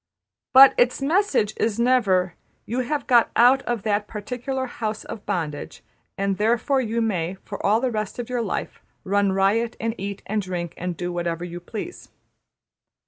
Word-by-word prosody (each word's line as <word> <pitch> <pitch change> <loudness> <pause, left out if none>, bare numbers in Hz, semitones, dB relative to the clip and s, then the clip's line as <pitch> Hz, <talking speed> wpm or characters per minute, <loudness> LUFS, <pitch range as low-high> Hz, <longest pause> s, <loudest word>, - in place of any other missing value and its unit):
But 270 +1 +9
its 245 0 +3
message 290 - +1
is 225 0 0
never: 200 -8 +2 0.3
``You 250 +4 -1
have 290 +4 -2
got 240 -3 +4
out 250 +3 +6
of 240 -4 -1
that 210 -1 0
particular 250 +5 -4
house 220 -3 -4
of 210 - -8
bondage 160 -7 -4 0.3
and 195 0 -1
therefore 240 +5 +2
you 230 -1 -1
may, 185 -5 -1
for 200 - -7
all 215 +2 +3
the 255 0 -1
rest 215 -2 -3
of 240 -2 -4
your 250 -1 -1
life, 220 - -4 0.2
run 200 0 +2
riot, 205 +5 +1
and 225 0 -1
eat, 200 +1 -5
and 215 0 -1
drink, 175 -3 -4
and 180 -1 -4
do, 175 0 -3
whatever 170 0 -2
you 175 0 -7
please.'' 220 - -8
215 Hz, 170 wpm, -23 LUFS, 190-245 Hz, 0.3 s, But